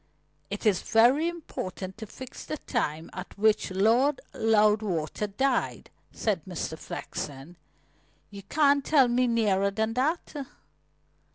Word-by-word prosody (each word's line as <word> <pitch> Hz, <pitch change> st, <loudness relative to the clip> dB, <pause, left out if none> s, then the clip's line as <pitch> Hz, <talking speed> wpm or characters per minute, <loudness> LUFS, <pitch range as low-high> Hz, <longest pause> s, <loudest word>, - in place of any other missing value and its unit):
"It -, -, -5 dB
is 205 Hz, -4 st, +3 dB
very 250 Hz, +8 st, +4 dB
important 190 Hz, -, -5 dB
to 220 Hz, -, -7 dB
fix 260 Hz, +4 st, -9 dB
the 305 Hz, -, -4 dB
time 160 Hz, -, -2 dB
at -, -, -8 dB
which 215 Hz, +1 st, +3 dB
Lord 230 Hz, +9 st, +3 dB
Loudwater 210 Hz, -5 st, +2 dB
died," 260 Hz, +6 st, -1 dB, 0.2 s
said 205 Hz, -7 st, -1 dB
Mr. 175 Hz, -3 st, -4 dB
Flexen. 145 Hz, 0 st, -7 dB, 0.8 s
"You 200 Hz, -1 st, -9 dB
can't 280 Hz, +6 st, +3 dB
tell 275 Hz, -4 st, +5 dB
me 245 Hz, +1 st, +2 dB
nearer 205 Hz, -4 st, +2 dB
than 220 Hz, +3 st, -1 dB
that?" 295 Hz, +8 st, -1 dB
220 Hz, 120 wpm, -27 LUFS, 195-260 Hz, 0.8 s, tell